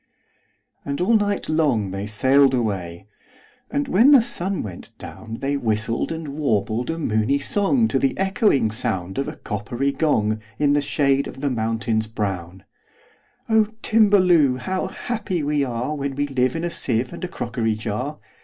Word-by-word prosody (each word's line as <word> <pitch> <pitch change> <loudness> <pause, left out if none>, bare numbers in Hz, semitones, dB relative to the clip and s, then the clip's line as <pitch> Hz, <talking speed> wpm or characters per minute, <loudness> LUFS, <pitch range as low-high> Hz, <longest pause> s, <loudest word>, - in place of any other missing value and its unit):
And 140 0 -4
all 185 +6 +2
night 205 -2 +1
long 140 -11 +1
they 95 +2 -4
sail'd 130 +5 +4
away; 95 -7 -3 0.6
And, 285 0 -1
when 235 +4 +5
the 275 -5 +7
sun 190 -3 -2
went 95 -5 -9
down, 110 +1 -8
They 140 +1 0
whistled 115 -1 -1
and 160 -2 -5
warbled 120 -5 -1
a 165 - -2
moony 110 -2 +1
songTo 205 - +1
the 135 - +1
echoing 195 - +2
sound 95 -4 -2
of 135 - -1
a - - -5
coppery 120 +6 -3
gong, 110 -9 0 0.2
In 145 -1 +2
the 145 - +3
shade 140 -1 +1
of - - -9
the 140 -2 0
mountains 110 -1 -1
brown,"O 100 - -4 0.2
Timballoo! 185 - +4
how 185 +9 -2
happy 210 -8 -3
we 145 0 0
areWhen 140 +2 -2
we 145 +1 0
live 130 0 0
in 165 - -3
a 175 - -2
sieve 125 -6 -1
and - - -8
a - - -1
crockery 115 -8 -2
jar! 120 +7 -4
135 Hz, 155 wpm, -22 LUFS, 110-165 Hz, 0.6 s, the